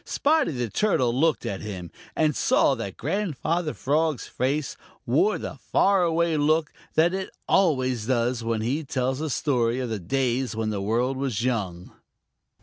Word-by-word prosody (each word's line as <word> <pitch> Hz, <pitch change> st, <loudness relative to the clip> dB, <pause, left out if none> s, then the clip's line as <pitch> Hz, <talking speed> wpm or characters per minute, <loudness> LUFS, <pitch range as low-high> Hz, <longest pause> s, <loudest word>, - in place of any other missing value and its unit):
Spotty 305 Hz, +1 st, +2 dB
the 120 Hz, -2 st, -2 dB
Turtle 130 Hz, -, +1 dB
looked 155 Hz, +5 st, +1 dB
at 95 Hz, -, -3 dB
him, 95 Hz, -5 st, -6 dB, 0.2 s
and 155 Hz, -2 st, +2 dB
saw -, -, +3 dB
that 115 Hz, -7 st, -5 dB
Grandfather 170 Hz, -, -1 dB
Frog's 155 Hz, 0 st, 0 dB
face 135 Hz, +3 st, -2 dB, 0.3 s
wore 405 Hz, +4 st, +2 dB
the -, -, -6 dB
far 195 Hz, -1 st, +4 dB
away 170 Hz, -1 st, +2 dB
look 155 Hz, +1 st, +2 dB, 0.2 s
that 170 Hz, +3 st, +4 dB
it 190 Hz, 0 st, -3 dB, 0.2 s
always 130 Hz, -, +2 dB
does 120 Hz, -1 st, 0 dB
when 115 Hz, -1 st, -1 dB
he 135 Hz, +8 st, -1 dB
tells 130 Hz, 0 st, -1 dB
a 160 Hz, -, -2 dB
story 125 Hz, -3 st, +1 dB
of 125 Hz, -2 st, -3 dB
the 110 Hz, -2 st, -3 dB
days 125 Hz, +5 st, -1 dB
when 110 Hz, -1 st, -1 dB
the 100 Hz, -2 st, -3 dB
world 120 Hz, +6 st, 0 dB
was 130 Hz, -5 st, -2 dB
young. 95 Hz, -8 st, -2 dB
130 Hz, 160 wpm, -25 LUFS, 115-160 Hz, 0.3 s, far